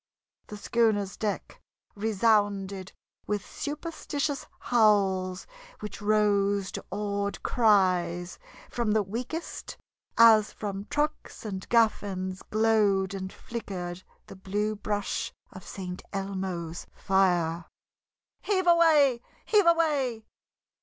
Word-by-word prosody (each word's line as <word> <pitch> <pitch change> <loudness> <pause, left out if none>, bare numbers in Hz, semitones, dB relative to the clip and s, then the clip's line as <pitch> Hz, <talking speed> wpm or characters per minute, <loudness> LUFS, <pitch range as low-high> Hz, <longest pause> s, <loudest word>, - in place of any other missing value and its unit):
The 210 - -8
schooner's 205 -2 +1
deck 210 -2 -4 0.3
resounded 205 -3 +1 0.4
with 205 -1 -2
superstitious 295 -2 -4
howls, 195 -5 +2 0.3
which 210 -1 -7
rose 205 -2 +2
to - - -6
awed 200 0 -3
cries 180 -6 +2 0.3
from 235 -3 0
the 215 -1 +3
weakest 250 - -6 0.4
as 220 -2 +7
from 200 -1 -5
trucks 300 -3 -3
and 190 -3 -5
gaff 230 -2 +4
ends 185 -2 -4
glowed 210 -3 +2
and 190 -1 -5
flickered 185 -6 -6 0.2
the - - -11
blue 205 +3 -2
brush 210 +2 -2 0.2
of 185 -2 -11
St. 180 -1 -7
Elmo's 190 -4 -4
fire. 175 -4 +1 0.8
"Heave 380 -3 0
away, 310 -8 +5 0.2
heave 410 -5 +4
away!" 285 -9 +2
205 Hz, 100 wpm, -28 LUFS, 190-230 Hz, 0.8 s, as